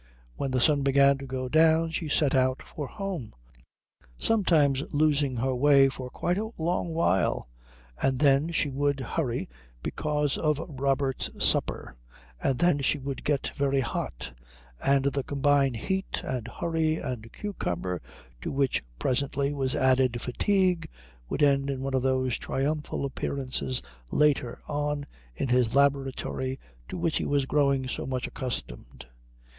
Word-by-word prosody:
When 140 - -2
the 130 0 +1
sun 145 +3 +4
began 140 0 +4
to 135 - -7
go 130 0 -3
down 160 +3 +4
she 165 -1 -3
set 145 -1 +2
out 130 0 +2
for 145 -3 -6
home, 185 - -5 0.8
sometimes 160 -11 +3
losing 145 -3 +2
her 130 +3 0
way 135 +1 +5
for 130 -1 -7
quite 175 +8 -1
a 220 +1 -3
long 170 +2 -1
while, 95 - +1 0.5
and 135 -1 +2
then 140 +4 +3
she 155 - +1
would 140 0 0
hurry 130 -1 -2 0.4
because 150 -2 -1
of 150 -2 +2
Robert's 135 -2 -1 0.2
supper, - - 0 0.5
and 135 - +1
then 175 -2 +3
she 140 +2 +1
would 135 -1 -5
get 145 -2 0
very 140 -1 +1
hot; 65 - -4 0.5
and 140 0 +3
the 140 0 +1
combined 140 -1 +2
heat 190 - -2
and 125 -3 -3
hurry 160 +4 0
and 115 -7 -5
cucumber, 90 - -3 0.4
to - - -3
which 135 -1 +1
presently 140 - 0
was 135 -1 0
added 130 -3 +3
fatigue, 180 - +1 0.4
would - - 0
end 140 -1 +3
in 135 -1 -2
one 135 0 -3
of 130 - +2
those 130 -2 +1
triumphal 145 +1 -2
appearances 130 -1 -3 0.3
later 145 -5 +2
on 145 -1 -2 0.3
in 135 - -2
his 125 -1 +2
laboratory 135 -1 +1 0.3
to - - -5
which 165 -3 0
he - - -1
was 140 -1 +1
growing 140 -2 +2
so - - -4
much 130 -1 -2
accustomed. 125 - -6
140 Hz, 145 wpm, -27 LUFS, 130-150 Hz, 0.8 s, way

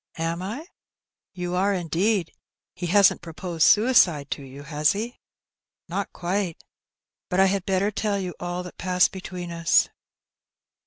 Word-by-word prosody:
"Am 165 +1 -2
I?" 225 - -5 0.7
"You 180 -1 -4
are, 195 +2 +2
indeed. 180 +2 0 0.4
He 175 - -4
hasn't 200 +2 +5
proposed 170 0 0
suicide 190 - +4
to - - -3
you, 135 +1 -10
has 150 +1 +2
he?" 225 +5 -5 0.7
"Not 195 +3 -3
quite. 180 -1 -2 0.7
Bat 180 - 0
I 190 - +7
had 195 -1 0
better 195 +2 +1
tell 205 0 -1
you 185 -2 -4
all 175 +1 -3
that 180 - -11
passed 180 -1 +3
between 180 -2 -7
us." 170 0 +3
180 Hz, 145 wpm, -25 LUFS, 170-200 Hz, 0.7 s, I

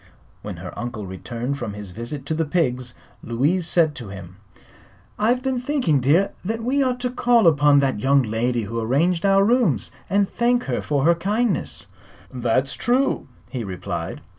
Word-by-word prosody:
When - - -7
her - - -8
uncle 120 -4 -5
returned 120 +8 -4
from 105 - -4
his 105 -3 -7
visit 120 +7 -6
to 160 - -2
the 160 +1 0
pigs 130 -6 -1 0.3
Louise 150 +10 0
said 165 -4 +3
to 115 -6 -7
him: 95 -1 -10 0.8
"I've 240 +4 +2
been 265 -2 0
thinking, 250 - +1
dear, 155 +10 +3
that 225 +4 -3
we 270 +4 +1
ought 255 -2 0
to 250 0 -1
call 240 -3 +3
upon 145 -3 +5
that 135 -5 0
young 135 +3 +3
lady 115 +1 -1
who 115 +3 -4
arranged 165 - +1
our 195 0 +5
rooms, 225 - +2 0.2
and 200 0 +2
thank 245 +3 +1
her - - -2
for 145 -2 0
her 170 - +6
kindness." 205 +3 -1 0.5
"That's 130 +2 0
true," 255 +3 0 0.2
he 125 -4 -3
replied. 95 -3 -5
150 Hz, 170 wpm, -22 LUFS, -, 0.8 s, her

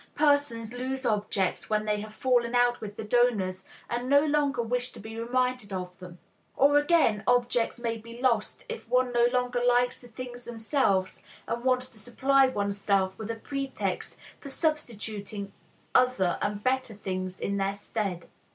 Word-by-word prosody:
Persons 285 -6 +2
lose 260 +2 -3
objects 205 -3 0
when 215 0 +1
they 210 -1 0
have 215 0 -8
fallen 245 +1 +1
out 245 0 +3
with 205 -2 -6
the - - -5
donors, 210 -5 +1 0.2
and 240 +2 -3
no 285 0 +6
longer 290 -4 +1
wish 245 +2 -1
to - - -11
be 220 +2 -8
reminded 250 -2 0
of 180 -1 -4
them. 180 -1 -10 0.4
Or 285 +2 +6
again, 290 - +3
objects 245 -1 +2
may 230 -1 -2
be 230 +2 -11
lost 250 - 0
if 470 -1 -7
one 250 0 +2
no 240 0 +5
longer 250 -1 0
likes 245 0 +2
the 245 - -12
things 245 +1 -8
themselves, 220 -5 0 0.3
and 235 +1 -3
wants 255 0 +2
to 225 - -13
supply 265 +4 +3
oneself 200 -4 0
with 220 0 -5
a 230 - -1
pretext 275 +3 -3 0.2
for 280 - -9
substituting 215 - -3 0.4
other 250 -8 +3
and 205 0 -2
better 255 -3 0
things 185 -2 -4
in 200 0 -1
their 195 0 0
stead. 200 -4 -3
235 Hz, 165 wpm, -28 LUFS, 205-255 Hz, 0.4 s, no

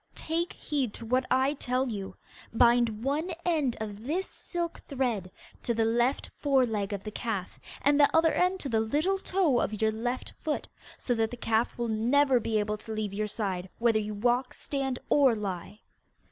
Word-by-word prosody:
Take 335 +2 -2
heed 270 -7 -2
to 230 - -7
what 255 +3 +1
I 265 +2 +3
tell 255 -1 -1
you. 200 -5 -5 0.4
Bind 235 -1 +3
one 295 +6 0 0.2
end 305 -8 +1
of 210 -1 -6
this 360 +6 0
silk 345 -2 -5
thread 245 - -1 0.3
to 235 - -1
the 225 0 +2
left 240 +4 +1
fore 275 -3 +3
leg 210 -4 -2
of 200 -1 -4
the 215 - -5
calf, 210 -5 -4 0.2
and 285 +1 +4
the 285 - +7
other 325 0 +4
end 365 +1 +2
to 275 - -4
the 225 -2 +2
little 305 - +1
toe 360 -11 +2
of 215 -2 -1
your 220 0 +3
left 245 +3 -3
foot, 305 -2 -2 0.3
so 245 - -1
that 225 -1 +1
the 245 - -7
calf 225 0 0
will 240 -1 -1
never 250 +4 +3
be 220 -1 0
able 210 0 0
to 220 +1 -9
leave 215 -2 -2
your 210 +1 -1
side, 190 -4 -3
whether 230 -2 +3
you 210 0 -4
walk, 245 +4 +1
stand, 270 -3 -2
or 270 -5 +5
lie. 205 0 -5
240 Hz, 190 wpm, -29 LUFS, 215-280 Hz, 0.4 s, the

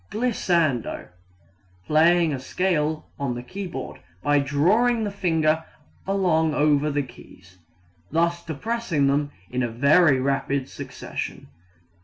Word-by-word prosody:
Glissando 170 - 0 0.8
playing 165 - +4
a 135 - -3
scale 155 +1 -1
on 135 -4 -2
the 120 - -6
keyboard 175 -2 -6 0.2
by 145 0 +3
drawing 200 - +2
the 205 - -2
finger 160 -5 +1 0.4
along 170 -5 +2
over 150 0 +3
the 145 -1 0
keys, 90 -7 -16 0.5
thus 170 +2 0
depressing 170 -1 -1
them 145 +1 +1 0.2
in 125 -2 -1
very 140 0 +5
rapid 135 0 -1
succession. - - -7
155 Hz, 110 wpm, -24 LUFS, 140-175 Hz, 0.8 s, very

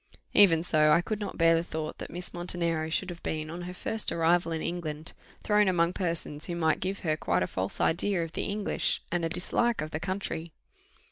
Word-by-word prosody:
Even 165 -6 +6
so 155 -3 +4
I 170 - +5
could 215 +3 -3
not 205 -2 -5
bear 165 0 +5
the 165 - +3
thought 155 -2 -5
that - - -6
Miss 175 +1 -3
Montenero 170 -2 -1
should 180 +3 -1
have 175 - -10
been, 155 0 -3
on 175 +2 -6
her - - -6
first 220 +4 -1
arrival 165 0 +2
in 160 - -1
England, 160 -2 -4 0.3
thrown 210 -1 +3
among 175 -1 +2
persons 165 -5 -2
who 175 - -3
might 160 -2 +1
give 190 +2 -3
her 155 -3 +1
quite 90 - 0
a - - +1
false 95 +2 -3
idea 175 +1 +1
of 165 - -6
the - - -3
English, 205 0 -1
and 175 0 0
a 165 - 0
dislike 235 +7 0
to 155 +1 -3
the 155 - -4
country. 170 -3 -4
170 Hz, 215 wpm, -29 LUFS, 160-180 Hz, 0.3 s, Even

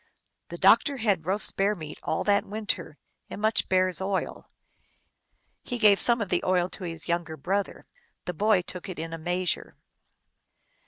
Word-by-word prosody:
The - - -8
doctor 285 -2 +4
had 200 -9 0
roast 195 +2 +2
bear 200 +2 +1
meat 155 -4 -9
all 160 - -2
that 205 -1 +3
win 215 +2 -7
ter, 165 -6 -3 0.3
and - - -7
much 215 +1 +2
bear 185 0 +3
s 185 0 0
oil. 190 0 -3 1.1
He 245 - -4
gave 210 -3 +5
some 235 -1 +3
of 205 - -3
the 175 - 0
oil 180 -1 +1
to 190 - -6
his 165 -3 -7
younger 170 -2 -2
brother. 195 +7 -3 0.4
The 180 - -3
boy 205 +1 +2
took 180 +1 -7
it 185 - -6
in 165 +1 -5
a 165 - -5
measure. 180 +1 -1
185 Hz, 175 wpm, -27 LUFS, 170-205 Hz, 1.1 s, gave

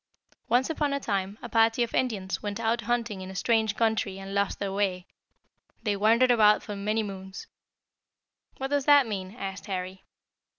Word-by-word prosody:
"Once 250 +2 +3
upon 295 -3 -1
a 280 - 0
time 200 -4 -2
a - - -4
party 225 +1 +3
of 235 - -5
Indians 205 -7 -1
went 205 +1 -4
out 230 +1 0
hunting 230 -5 -1
in 185 - -7
a 190 - -9
strange 220 +1 +1
country 220 -4 0
and 195 0 -7
lost 200 0 0
their 200 -1 -3
way. 190 -3 -1 0.8
They 210 -3 0
wandered 230 +5 +4
about 210 -3 +5
for 205 - -6
many 210 +2 -1
moons." 190 -1 -8 1.1
"What 270 +1 -4
does 285 -2 +1
that 290 -2 +7
mean?" 195 -2 -5
asked 195 -3 -6
Harry. 185 -1 -5
210 Hz, 175 wpm, -27 LUFS, 195-235 Hz, 1.1 s, that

